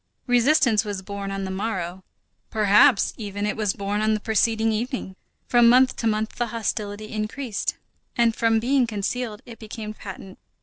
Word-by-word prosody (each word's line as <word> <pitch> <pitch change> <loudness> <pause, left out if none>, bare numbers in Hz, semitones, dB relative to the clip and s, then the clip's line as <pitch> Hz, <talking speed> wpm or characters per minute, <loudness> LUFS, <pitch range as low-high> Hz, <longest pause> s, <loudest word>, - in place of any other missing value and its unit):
Resistance 245 -2 +3
was 205 -3 -5
born 200 0 -5
on 195 0 -3
the 190 - -4
morrow; 190 -2 -3 0.5
perhaps 210 +3 +4
even, 205 -2 -4
it 210 - -1
was 210 -3 0
born 200 +1 -2
on 215 0 +2
the - - -2
preceding 220 +1 +1
evening. 225 -3 -3 0.3
From 240 -1 +5
month 255 +1 +5
to 230 - -1
month 215 0 -1
the 240 - 0
hostility 215 -2 -3
increased, 215 +2 -3 0.4
and 235 -1 +3
from 225 -1 +2
being 255 +2 +2
concealed 215 +1 -3
it 230 -2 -11
became 215 -1 -7
patent. 195 -2 -10
215 Hz, 165 wpm, -24 LUFS, 205-235 Hz, 0.5 s, From